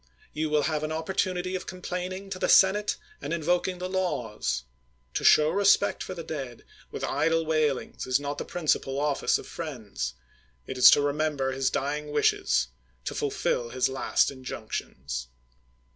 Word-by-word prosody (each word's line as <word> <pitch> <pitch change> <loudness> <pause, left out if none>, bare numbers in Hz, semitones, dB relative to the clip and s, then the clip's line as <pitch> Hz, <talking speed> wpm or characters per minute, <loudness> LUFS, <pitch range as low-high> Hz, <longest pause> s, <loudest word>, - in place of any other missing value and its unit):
You 155 0 -1
will 150 -1 +2
have 155 0 0
an 155 0 -3
opportunity 180 +2 -1
of 185 - -4
complaining 185 +1 -5
to 185 - -4
the - - 0
senate 205 +2 +5 0.2
and 145 - -5
invoking 175 +2 0
the 180 +1 -4
laws. 120 - -2 0.5
To - - -2
show 155 +1 +6
respect 200 +2 +3
for 185 - -5
the 170 - -6
dead 135 -7 -6 0.2
with - - -6
idle 165 0 +1
wailings 155 -5 0
is 130 +1 +3
not 145 0 -4
the - - -2
principal 145 -5 0
office 145 -1 +2
of - - -9
friends 105 - -5 0.3
— 60 0 -37
it 130 - -5
is 125 - +9
to 145 - +5
re 145 0 +1
member 145 -3 0
his 130 0 +1
dying 150 +2 -2
wishes, 65 - +2 0.4
to - - -2
fulfil 120 -1 -1
his 130 +2 +1
last 130 +1 +1
in 130 -2 -12
junctions. 65 - -5
150 Hz, 170 wpm, -27 LUFS, 130-180 Hz, 0.5 s, is